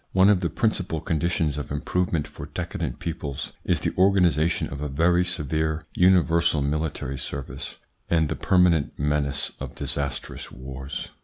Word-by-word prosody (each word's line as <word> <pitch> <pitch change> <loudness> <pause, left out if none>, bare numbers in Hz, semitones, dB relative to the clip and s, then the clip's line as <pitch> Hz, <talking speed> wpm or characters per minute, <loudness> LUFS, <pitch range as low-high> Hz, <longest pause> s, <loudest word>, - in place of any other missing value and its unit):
One 95 +1 +6
of 100 -3 +4
the 85 - 0
principal 90 -3 0
conditions 80 -2 0
of 75 - -6
improvement 80 +1 0
for - - -9
decadent - - -4
peoples 80 -5 -4
is - - +1
the - - -1
organisation 90 -4 +3
of 70 - -6
a 75 - -1
very 85 +5 +3
severe 80 -1 -1
universal 85 -4 +4
military 70 -2 -2
service 70 0 -6 0.3
and 80 -2 +3
the - - -2
permanent 90 -5 +3
menace 75 -1 0
of - - -6
disastrous 70 -2 -4
wars. 65 +2 -6
80 Hz, 145 wpm, -25 LUFS, 70-90 Hz, 0.3 s, One